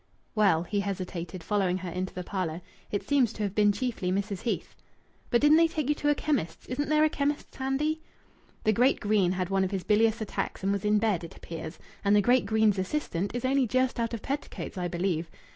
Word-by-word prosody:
"Well," 195 -7 +3
he 205 +3 -1
hesitated, 185 -3 -4
following 190 -3 +1
her 185 -1 -5
into 185 +2 -3
the 180 - -5
parlour, 175 -3 -3 0.3
"it 205 - -3
seems 270 -6 +3
to 215 - -4
have 200 -2 -2
been 205 0 +4
chiefly 205 -4 -2
Mrs. 200 0 -2
Heath." 235 - -3 0.5
"But 240 - +3
didn't 295 +2 +6
they 330 0 +6
take 305 -4 -3
you - - +5
to 295 0 -1
a 295 - +4
chemist's? 265 - -2
Isn't 290 +4 -2
there 305 0 +4
a - - +6
chemist's 290 -1 -2
handy?" 290 +4 -1 0.6
"The 215 - +3
great 250 +5 +3
Greene 205 -4 +2
had 185 0 -2
one 195 0 +3
of 190 - 0
his 190 -2 -3
bilious 220 +2 +3
attacks 215 -3 -4
and 195 - +2
was 200 0 -1
in 210 0 +4
bed, 210 -5 +1
it 170 - -9
appears. 160 -1 -7 0.3
And 200 +1 +4
the - - +6
great 245 +4 +3
Greene's 220 -3 +3
assistant 195 - -2
is 245 - -2
only 265 -1 +2
just 255 +1 +1
out 230 0 -1
of 225 - -9
petticoats, 280 -4 -4
I 180 -1 -2
believe. 175 -2 -1
210 Hz, 220 wpm, -28 LUFS, 185-255 Hz, 0.6 s, didn't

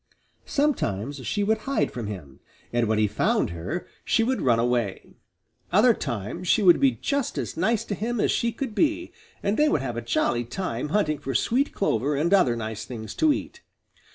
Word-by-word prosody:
Sometimes 145 - -1
she 205 - 0
would 220 +2 +1
hide 275 - +1
from 120 -4 -5
him, 85 -10 -8 0.3
and 120 -1 +2
when 110 0 +1
he 110 - +3
found 100 - +1
her 85 - -4 0.2
she 225 - +2
would 255 +3 0
run 120 -3 +3
away. 120 -4 -1 0.6
Other 220 +6 +6
times 120 - -4
she 215 - +3
would 175 -3 +7
be 275 -2 +4
just 280 -3 -2
as - - -3
nice 220 +6 +1
to 210 - -3
him 230 +3 -2
as - - +2
she 235 - +1
could 230 0 -5
be, 325 +6 0 0.3
and 200 +2 +1
they 300 0 +4
would 145 - +1
have 120 -3 -4
a - - -2
jolly 120 +1 0
time 125 0 -4
hunting 155 -5 +1
for 135 -1 -4
sweet 255 - +1
clover 145 - 0
and 165 +7 +1
other 135 -12 +4
nice 110 -1 -5
things 110 -4 -7
to 315 - +3
eat. - - -4
155 Hz, 195 wpm, -25 LUFS, -, 0.6 s, would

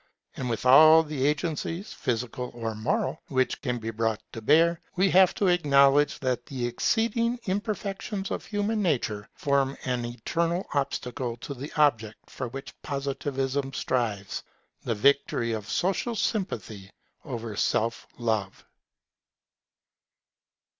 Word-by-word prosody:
And 125 -2 -3
with 115 +1 -3
all 155 +5 +8
the 145 -3 -1
agencies, 165 +5 -2
physical 125 +1 -3
or 115 -2 -3
moral, 155 - -1
which 130 -2 0
can 125 -3 -1
be 115 -1 -4
brought 110 -1 -1
to 115 - -6
bear, 165 +7 +4
we 190 +2 +3
shall 185 - +6
have 190 -2 +5
to 205 - 0
acknowledge 145 -5 +4
that 125 -2 -1
the 130 -3 -3
exceeding 230 - +1
imperfections 200 0 -3
of - - -3
human 210 +1 -1
nature 120 - -1
form 140 -1 +1
an 125 -2 -1
eternal 165 +10 -1
obstacle 125 -3 -2
to 140 - -6
the 140 +3 -7
object 115 -8 +1
for 130 - -4
which 135 +3 -8
Positivism 135 -1 -2
strives, 110 -8 -2 0.4
the 115 - -1
victory 120 0 +2
of 110 -1 -4
social 195 +6 0
sympathy 110 - -3 0.3
over 115 -6 -5
self 115 +3 0
love. 110 -5 -2
135 Hz, 130 wpm, -27 LUFS, 115-170 Hz, 0.4 s, all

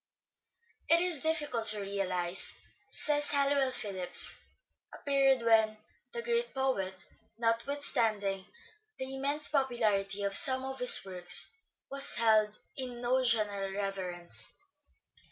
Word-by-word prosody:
" 470 - -35
It 335 - +4
is 345 -5 +3
difficult 295 -8 -2
to 210 -1 +4
realize," 185 -2 0 0.3
says 295 +1 -1
Halliwell 280 -2 +1
Phillipps, 190 -7 -2 0.3
" - - -33
a - - -11
period 270 -3 +1
when... 220 -1 +2 0.3
the 470 0 -6
great 475 -4 -2
poet, 190 -10 -3 0.3
notwithstanding 230 -5 -1 0.5
the 260 0 -7
immense 285 +3 +1
popularity 215 -8 -1
of 200 0 -3
some 260 +2 +7
of 265 0 -7
his 250 -4 +6
works, 180 -2 +1 0.4
was 275 +1 +1
held 215 -2 +2 0.2
in 250 -3 -7
no 255 +2 0
general 205 -5 0
reverence. 190 - -5
235 Hz, 120 wpm, -30 LUFS, 200-275 Hz, 0.5 s, some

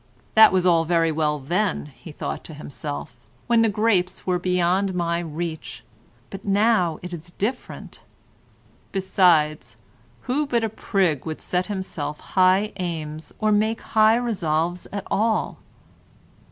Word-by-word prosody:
"That 220 0 +8
was 185 -1 +1
all 170 -2 +4
very 165 0 +2
well 150 -1 0
then," 175 +8 -1
he 165 - -11
thought - - -5
to 160 - -9
himself, 145 -3 -6 0.3
"when 235 -1 +3
the 225 - +4
grapes 205 -4 0
were 180 -1 +1
beyond 180 +1 +1
my 170 -1 0
reach, 165 -1 -5 0.5
but 195 0 -8
now 200 -5 +2
it 180 0 -6
is 170 0 -8
different." 240 +6 -4 0.9
Besides, 160 -9 +2 0.4
who 290 +4 -1
but 235 -4 +1
a 225 - 0
prig 190 - 0
would 155 - -4
set 180 0 -2
himself 185 -7 -4
high 190 +3 +2
aims, 160 -4 -5
or 215 -1 +1
make 220 +2 +1
high 220 0 +4
resolves 175 -7 -1
at 200 -1 -5
all? 220 +1 0
180 Hz, 140 wpm, -23 LUFS, 160-210 Hz, 0.9 s, That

